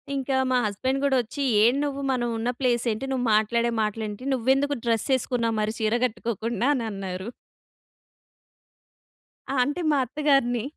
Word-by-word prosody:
ఇంకా 270 -1 -1
మా 255 - +3
హస్బాండ్ 260 +7 -1
కూడా 265 -2 +3
వచ్చి 260 +5 -7 0.2
"ఏం 240 +3 +4
నువ్వు 280 -1 -3
మనం 240 -2 0
ఉన్న 230 +2 -1
ప్లేస్ 245 -2 +1
ఏంటి? 220 +5 -4
నువ్వు 255 -1 -1
మాట్లాడే 235 +2 +1
మాటలు 215 +1 -2
ఏంటి? 210 +5 -8
నువ్వెందుకు 265 +3 +1
డ్రెస్ 230 -2 +1
వేసుకున్నావ్ 235 -3 0
మరి 215 +1 -1
చీర 220 +2 +1
కట్టుకోకుండా?" 230 0 -2
అని 245 - -2
అన్నారు. 190 0 -5 2.2
ఆ! - - -1
అంటే 290 +7 -2
మా 290 - +3
అత్తగారిని 265 -3 +1
240 Hz, 150 wpm, -25 LUFS, 220-265 Hz, 2.2 s, ఏం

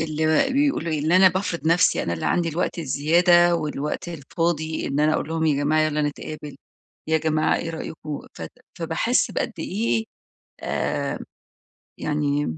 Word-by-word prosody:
اللي 160 - +1
بيقولوا 275 - +1
إيه 155 - 0
إن 165 - +2
أنا 185 +1 +7
بافرض 180 -3 -3
نفسي، 170 +2 +3
أنا 85 - -2
اللي 80 - -3
عندي 175 -1 +1
الوقت 170 +2 -2
الزيادة، 175 +4 +4
والوقت 150 +1 -3
الفاضي 160 0 -2
إن 140 +2 -1
أنا 155 +1 +3
أقول 150 - -2
لهم 160 0 0
يا 150 - +2
جماعة 155 +2 +3
يلا 150 -1 +1
نتقابل 150 0 -5 0.5
يا 160 - +3
جماعة 155 0 +1
إيه 165 - -4
رأيكوا 155 -2 -6
ف - - -9 0.4
فباحس - - +1
بقد - - -2
إيه 115 +1 -1 0.6
آآ، - - -2 0.8
يعني 145 - -1
155 Hz, 155 wpm, -23 LUFS, 150-170 Hz, 0.8 s, أنا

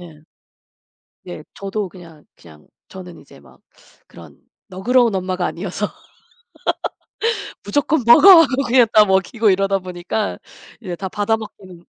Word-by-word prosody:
예. 165 -4 -14 1.1
예. - - -9
저도 200 0 -5
그냥, 165 -5 -16
그냥 75 -2 -19 0.2
저는 180 -2 -12
이제 - - -18
막 - - -21 0.5
그런 - - -16 0.3
너그러운 230 +5 +1
엄마가 185 -1 -3
아니어서 190 +3 -4 1.8
"무조건 290 -1 -1
먹어" 340 +9 +8
하고 275 -3 0
그냥 245 0 +4
갖다 215 -1 +6
먹이고 195 +3 +1
이러다 195 0 +1
보니까 180 +3 -4 0.4
이제 180 -5 -6
다 190 +2 -6
받아먹기는 205 -4 -5
195 Hz, 270 characters per minute, -19 LUFS, 180-225 Hz, 1.8 s, 먹어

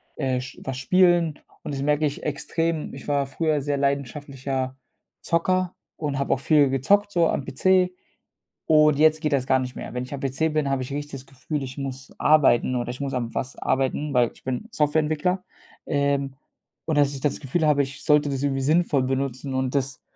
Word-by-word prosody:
äh, 130 -3 -1
sch 130 - -9
was 135 -1 -4
spielen 175 +1 +3 0.2
und 145 - -5
das 135 - -3
merke 150 +1 +2
ich 145 - -6
extrem. 160 +2 -2
Ich - - -10
war 140 -2 +1
früher 155 +1 0
sehr 145 0 -1
leidenschaftlicher 140 -1 -2 0.5
Zocker 185 +2 0 0.2
und 145 -3 -2
habe 140 - +1
auch - - -2
viel 145 0 +4
gezockt, 200 +11 +2
so 170 -3 +3
am 140 - -1
PC, 185 +5 +2 0.7
und 150 -2 +5
jetzt 155 +1 +4
geht 155 -2 -1
das 130 -2 +1
gar 130 -1 +4
nicht 125 0 -5
mehr. - - -7
Wenn 125 0 -2
ich 130 - -8
am 140 - -5
PC 140 +4 0
bin, 150 -2 +1
habe 135 -1 0
ich 130 - -8
richtig 145 +1 -4
das 135 -1 -8
Gefühl, 135 +3 -5
ich 130 +1 -7
muss 135 -1 -6
arbeiten 135 -4 +4
oder 120 0 -3
ich 125 +3 -8
muss 140 0 -3
an 120 -2 -3
was 130 +1 -3
arbeiten, 135 +2 -1
weil 120 -2 +3
ich - - -21
bin 130 - -3
Softwareentwickler. 155 +4 +1 0.4
Ähm, 140 -2 0 0.5
und 160 -2 0
dass 145 -1 +3
ich 135 - -5
das 150 - -1
Gefühl 155 +3 0
habe, 145 -1 +4
ich 135 +1 -8
sollte 150 -2 +4
das 135 -1 -2
irgendwie 135 -1 0
sinnvoll 150 -1 +2
benutzen 135 0 -2
und 130 0 -1
das 135 -1 -1
140 Hz, 200 wpm, -24 LUFS, 135-155 Hz, 0.7 s, und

